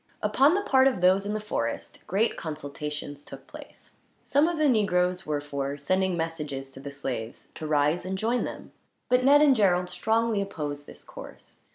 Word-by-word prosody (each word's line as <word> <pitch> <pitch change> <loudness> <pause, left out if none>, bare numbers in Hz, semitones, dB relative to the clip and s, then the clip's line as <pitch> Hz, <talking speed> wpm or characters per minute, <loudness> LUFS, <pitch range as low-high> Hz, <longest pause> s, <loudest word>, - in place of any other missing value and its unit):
Upon 285 +6 +4
the 400 - +1
part 265 -8 +4
of 260 -8 0
those 190 +3 +3
in 210 - -2
the - - -1
forest, 115 - -4
great 210 +5 +1
consultations 150 -1 -6
took - - -11
place. - - -13 0.3
Some 290 +3 +3
of 345 -1 -2
the 305 -1 +3
negroes 185 - +1
were 150 -1 0
for 140 -1 -4
sending 185 +5 0
messages 150 -5 -4
to 135 - -12
the 140 - -7
slaves 125 -5 -6
to 155 - -6
rise 150 +3 +2
and 190 +1 -3
join 235 +5 0
them, - - -7 0.4
but 250 0 +3
Ned 290 +3 +6
and 280 -3 +5
Gerald 180 -4 +2
strongly 225 +1 +1
opposed 145 -7 -5
this - - -13
course. - - -12
180 Hz, 185 wpm, -27 LUFS, 145-225 Hz, 0.4 s, Ned